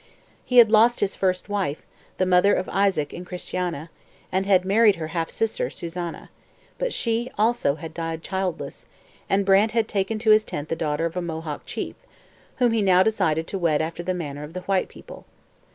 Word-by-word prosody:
He 250 - 0
had 230 -3 +8
lost 230 +2 +5
his 200 -1 0
first 185 -1 0
wife, 195 -8 -2 0.3
the 185 - +2
mother 185 +2 +4
of 185 - -2
Isaac 195 -7 +1
and 175 - -7
Christiana, 175 -3 -4 0.4
and 190 +1 0
had 185 -2 +4
married 210 +1 +5
her 160 -1 -5
half 165 0 -2
sister, 225 -1 -1
Susanna; 170 -1 -6 0.5
but - - -1
she 235 +1 -1
also 215 -10 +2
had 160 0 -8
died 165 -1 -4
childless, 190 -3 -4 0.4
and 195 0 +2
Brant 200 +3 +4
had 225 -2 +1
taken 200 +2 -1
to 215 0 +3
his 215 0 +6
tent 150 -5 -6
the - - 0
daughter 160 0 -1
of 165 0 -3
a - - 0
Mohawk 160 -3 -5
chief, - - -4 0.6
whom 245 -2 +2
he 225 -1 +1
now 185 -2 +5
decided 175 -7 +1
to 195 - -4
wed 165 -4 +2
after 165 +2 -3
the 185 +1 -2
manner 145 -5 -5
of 150 +2 -9
the 185 - -5
white 190 0 0
people. - - -13
185 Hz, 195 wpm, -24 LUFS, 165-205 Hz, 0.6 s, had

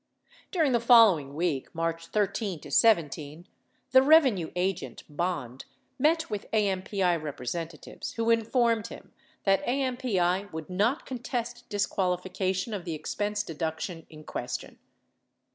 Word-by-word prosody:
During 320 -7 +2
the 240 - +3
following 215 - +5
week 160 -5 -2
(March 165 0 -2
13 200 -3 -1
17), 165 - +2 0.4
the 260 +1 +8
revenue 265 - +5
agent, 185 0 -2
Bond, 145 -6 -3 0.3
met 320 +4 +3
with 205 -1 -5
AMPI 190 -4 +1
representatives 155 +3 -6
who 230 0 +1
informed 230 -1 +2
him - - -12 0.3
that 195 -1 +3
AMPI 240 -8 0
would 160 +2 -7
not 215 - +1
contest 245 -1 -5
disqualification 185 0 -1
of 195 -4 -4
the 170 -3 -4
expense 205 +6 -2
deduction 165 0 -4
in 155 -1 -12
question. - - -5
190 Hz, 115 wpm, -28 LUFS, 165-230 Hz, 0.4 s, the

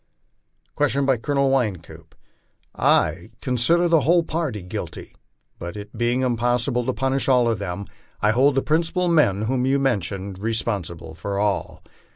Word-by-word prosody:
Question 140 - +1
by 135 -2 +3
Colonel 140 +3 +1
Wynkoop: 110 -11 -3 0.4
" - - -41
I 85 +6 +2
consider 130 +8 +2
the 165 -2 +4
whole 170 +5 +3
party 155 - -3
guilty; 90 - -7 0.5
but 85 +4 -6
it 105 +1 -9
being 120 +2 0
impossible 120 0 0
to - - +2
punish 135 +1 0
all 125 -2 +4
of 115 -4 0
them, 100 0 -4 0.3
I 105 - +3
hold 130 +4 +3
the 135 - +1
principal 170 +3 +1
men, 145 - +3
whom 125 +3 0
you 135 +1 +3
mentioned, 100 - -2
responsible 100 -7 -3
for 100 +5 -4
all. 100 -2 -1
120 Hz, 155 wpm, -23 LUFS, 100-135 Hz, 0.5 s, the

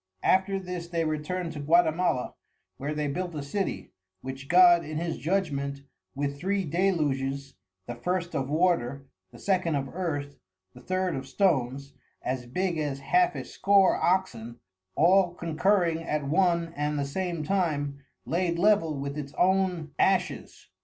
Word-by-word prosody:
After 190 +1 +3
this 180 -2 -5
they 170 -1 -1
return'd 160 +3 -2
to 150 - -7
Gautimala, 160 -2 +2 0.4
where 145 +3 -3
they 150 0 -1
built 175 +3 -3
a 145 - -4
City, 195 +8 -3 0.3
which 130 +1 -7
God 175 0 +6
in 155 0 -5
his 165 0 -3
Judgement 140 -6 -1 0.3
with 140 0 -3
Three 195 +3 0
Deluges, 140 -6 0 0.3
the 120 - -5
First 175 +8 -2
of 135 0 -2
Water, 145 -5 +1 0.3
the - - -13
Second 185 -5 0
of 135 -1 -2
Earth, 145 -6 -3 0.3
the - - -14
Third 185 -1 -1
of 135 0 -5
Stones, 140 -5 0 0.3
as 125 -1 -3
big 175 +5 -1
as 145 -3 -2
half 360 - +2
a - - -5
score 195 -1 +3
Oxen, 120 -11 -1 0.4
all 180 +1 +4
concurring 170 0 +1
at 150 -3 -2
one 170 +1 +2
and 150 +1 -1
the 140 - 0
same 170 +2 -3
time, 150 -6 -1 0.3
laid 170 0 0
Level 175 -5 +3
with 140 +2 -4
its 140 -1 -7
own 180 -4 +1
Ashes. 190 -1 0
165 Hz, 150 wpm, -27 LUFS, 140-185 Hz, 0.4 s, God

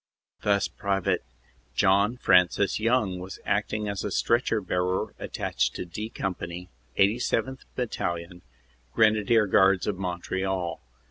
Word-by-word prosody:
Thus 100 -1 +2
Pte. 100 -3 -1 0.6
John 100 - +3
Francis 95 -1 +3
Young 110 -5 +1
was 95 +1 -7
acting 105 +1 -1
as 100 -1 -3
stretcher 115 -1 +2
bearer 90 -1 -1
at - - -6
tached - - -1
to - - -4
D 105 +6 -6
Company, 90 -4 -5 0.3
87th. 120 +5 +1
Battalion, 90 -7 -3 0.5
Grenadier 110 0 +4
Guards 95 -1 +4
of 100 -3 -2
Montreal. 95 0 -2
100 Hz, 115 wpm, -27 LUFS, 90-110 Hz, 0.6 s, Grenadier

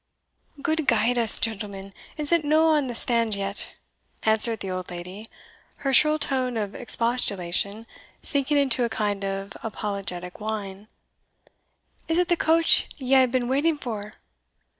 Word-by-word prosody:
Gude 315 -3 0
guide 235 0 +2
us, 230 -2 +2
gentlemen, 200 -3 -3 0.2
is 300 0 0
it 335 -2 +3
no 310 +2 +3
on 300 -4 +2
the 240 - -5
stand 230 -2 +1
yet?" 195 0 0 0.5
answered 220 +1 +2
the 190 - -3
old 185 0 -5
lady, 180 +5 -8 0.6
her 270 - +1
shrill 305 +4 +6
tone 260 -4 -1
of 205 -2 -3
expostulation 215 -4 0 0.4
sinking 285 0 0
into 265 -3 +3
a 235 - 0
kind 205 -2 -2
of 195 +1 -4
apologetic 195 -5 -5
whine. 210 -2 -5 1.2
"Is 325 0 0
it 355 0 +1
the 345 - +4
coach 330 0 +4
ye 265 -1 -2
hae 260 -1 +6
been 245 0 -1
waiting 295 +5 +1
for?" 215 -6 -6
230 Hz, 145 wpm, -24 LUFS, 200-275 Hz, 1.2 s, shrill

